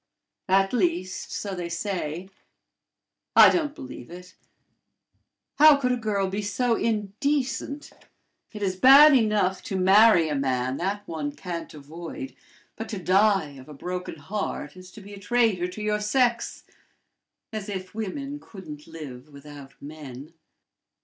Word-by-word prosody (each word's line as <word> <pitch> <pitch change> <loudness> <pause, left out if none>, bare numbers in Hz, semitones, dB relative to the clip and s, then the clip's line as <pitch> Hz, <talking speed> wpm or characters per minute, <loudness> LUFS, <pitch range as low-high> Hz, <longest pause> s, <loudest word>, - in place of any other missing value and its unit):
At 195 +2 +3
least, 185 -4 -1
so 200 -2 -4
they 175 -2 -5
say 170 -1 -4 1.1
I - - +9
don't 300 -4 -1
believe 125 0 -10
it: 180 +1 -11 1.3
how 305 -1 +8
could 250 -3 0
a - - +2
girl 210 -4 -1
be 195 +2 -3
so 230 +4 0
indecent? 255 +7 -2 0.6
It 210 -2 -6
is 190 -2 0
bad 280 +7 +8
enough 210 -5 +2
to 195 - -4
marry 190 -1 +5
a 150 - -2
man: 130 -2 -1
that 200 +3 -3
one 150 -3 -4
can't 170 -3 -6
avoid; 170 - -8 0.4
but 225 - -7
to 210 - -4
die 190 -3 +2
of 130 +2 -13
a 150 - -10
broken 180 +5 -5
heart 195 -7 -5
is 185 0 -12
to 215 - -11
be 200 +1 -12
a 200 - -9
traitor 205 -4 +1
to 185 +4 -7
your 210 0 0
sex. 240 +2 0 0.9
As 215 -1 -5
if 190 -2 -6
women 275 +7 -5
couldn't 155 - -11
live 150 -4 -10
without 140 -1 -13
men!" 145 0 -10
190 Hz, 145 wpm, -25 LUFS, 165-220 Hz, 1.3 s, I